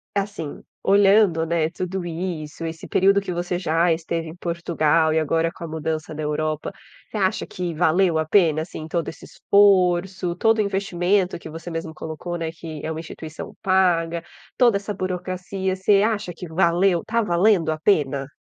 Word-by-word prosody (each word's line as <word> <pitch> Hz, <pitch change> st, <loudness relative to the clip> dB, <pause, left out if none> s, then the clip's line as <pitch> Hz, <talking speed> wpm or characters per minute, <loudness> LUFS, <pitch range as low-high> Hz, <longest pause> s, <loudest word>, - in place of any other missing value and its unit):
e -, -, +3 dB
assim 195 Hz, -7 st, -6 dB, 0.2 s
olhando, 195 Hz, -4 st, +4 dB
né, 165 Hz, -1 st, 0 dB
tudo 185 Hz, +1 st, -4 dB
isso, 165 Hz, -2 st, -5 dB
esse 165 Hz, 0 st, -6 dB
período 195 Hz, +1 st, +4 dB
que 190 Hz, -, -5 dB
você 175 Hz, +1 st, -2 dB
já 165 Hz, -1 st, +2 dB
esteve 165 Hz, 0 st, -3 dB
em 160 Hz, -, -8 dB
Portugal 165 Hz, -2 st, +1 dB
e 160 Hz, -, +3 dB
agora 165 Hz, +2 st, +1 dB
com 170 Hz, -, -11 dB
a -, -, -4 dB
mudança 155 Hz, 0 st, -3 dB
da 155 Hz, -, -5 dB
Europa, 155 Hz, +3 st, -2 dB, 0.4 s
você -, -, -11 dB
acha 190 Hz, -2 st, 0 dB
que 175 Hz, -2 st, -4 dB
valeu 175 Hz, +1 st, +2 dB
a 155 Hz, -, 0 dB
pena, 160 Hz, -5 st, +3 dB
assim, 160 Hz, -2 st, -8 dB
todo 170 Hz, -2 st, -1 dB
esse -, -, -8 dB
esforço, 185 Hz, -2 st, +2 dB
todo 225 Hz, 0 st, +3 dB
o -, -, +3 dB
investimento 190 Hz, -2 st, 0 dB
que 160 Hz, -, -9 dB
você 165 Hz, +2 st, -8 dB
mesmo 165 Hz, -1 st, -5 dB
colocou, 160 Hz, +3 st, -6 dB
né, 165 Hz, -1 st, -3 dB
que 160 Hz, -2 st, -8 dB
é 160 Hz, -, -2 dB
uma 160 Hz, -, -4 dB
instituição 160 Hz, -1 st, -8 dB
paga, 170 Hz, -3 st, +2 dB, 0.3 s
toda 240 Hz, -5 st, +5 dB
essa 200 Hz, +1 st, -3 dB
burocracia 185 Hz, +1 st, -3 dB
você 195 Hz, +1 st, +3 dB
acha 215 Hz, -5 st, -1 dB
que 175 Hz, -1 st, -8 dB
valeu 175 Hz, +1 st, +2 dB
tá 230 Hz, +1 st, +1 dB
valendo 175 Hz, -3 st, +3 dB
a 155 Hz, -, -3 dB
pena? 140 Hz, -7 st, +1 dB
175 Hz, 180 wpm, -23 LUFS, 160-190 Hz, 0.4 s, toda